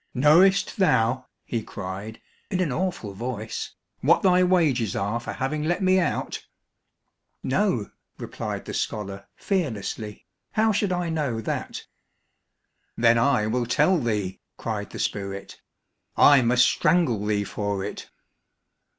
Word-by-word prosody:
"Knowest 170 Hz, +9 st, +4 dB
thou," 130 Hz, -, +2 dB, 0.2 s
he 115 Hz, -, -2 dB
cried 100 Hz, +3 st, -7 dB, 0.3 s
in 185 Hz, -3 st, -1 dB
an 175 Hz, -6 st, +1 dB
awful 170 Hz, -, -2 dB
voice, 110 Hz, +1 st, -5 dB, 0.2 s
"what -, -, +3 dB
thy 185 Hz, -1 st, +5 dB
wages 155 Hz, -, +2 dB
are 105 Hz, +4 st, -1 dB
for 120 Hz, -, -6 dB
having 135 Hz, +4 st, -2 dB
let 175 Hz, +5 st, 0 dB
me 185 Hz, 0 st, +4 dB
out?" 170 Hz, -5 st, -2 dB, 1.0 s
"No," 130 Hz, -, 0 dB, 0.3 s
replied -, -, -5 dB
the -, -, -6 dB
scholar 100 Hz, -2 st, -4 dB
fearlessly, 110 Hz, -, -3 dB, 0.3 s
"how 220 Hz, +1 st, +3 dB
should 205 Hz, -2 st, 0 dB
I 175 Hz, -1 st, -1 dB
know 145 Hz, -8 st, -1 dB
that?" 110 Hz, -, -4 dB, 1.1 s
"Then 115 Hz, 0 st, +4 dB
I 115 Hz, -3 st, +3 dB
will 120 Hz, +2 st, -1 dB
tell 180 Hz, +9 st, +3 dB
thee," 105 Hz, -7 st, -2 dB, 0.2 s
cried -, -, -4 dB
the -, -, -9 dB
spirit; 100 Hz, 0 st, -4 dB, 0.6 s
"I 145 Hz, -2 st, +7 dB
must 125 Hz, +1 st, +4 dB
strangle 140 Hz, -, +2 dB
thee 105 Hz, -1 st, 0 dB
for 100 Hz, -1 st, -3 dB
it." 105 Hz, -, -7 dB
125 Hz, 130 wpm, -25 LUFS, 105-175 Hz, 1.1 s, I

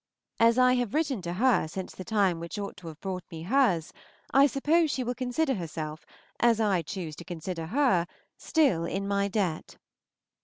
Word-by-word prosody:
As 230 Hz, +1 st, +5 dB
I 255 Hz, 0 st, +5 dB
have 245 Hz, -2 st, -2 dB
written 285 Hz, -9 st, 0 dB
to 175 Hz, 0 st, -4 dB
her 225 Hz, -3 st, +3 dB
since 185 Hz, +4 st, -6 dB
the 185 Hz, -, -8 dB
time 195 Hz, -5 st, +1 dB
which 170 Hz, +5 st, -6 dB
ought 200 Hz, -1 st, -5 dB
to 180 Hz, -3 st, -11 dB
have 160 Hz, -1 st, -9 dB
brought 185 Hz, -2 st, -4 dB
me 160 Hz, -1 st, -8 dB
hers, 195 Hz, -, +2 dB, 0.4 s
I 275 Hz, +1 st, +7 dB
suppose 305 Hz, +4 st, +2 dB
she 265 Hz, -2 st, -1 dB
will 245 Hz, +1 st, -2 dB
consider 260 Hz, +4 st, 0 dB
herself, 155 Hz, -5 st, -5 dB, 0.3 s
as 235 Hz, -2 st, +4 dB
I 200 Hz, -5 st, +2 dB
choose 165 Hz, -1 st, -6 dB
to -, -, -8 dB
consider 170 Hz, -1 st, -5 dB
her, 230 Hz, -, +2 dB, 0.3 s
still 270 Hz, -, +2 dB
in 195 Hz, +3 st, -3 dB
my 200 Hz, 0 st, +1 dB
debt. 190 Hz, -6 st, -2 dB
200 Hz, 185 wpm, -28 LUFS, 170-250 Hz, 0.4 s, I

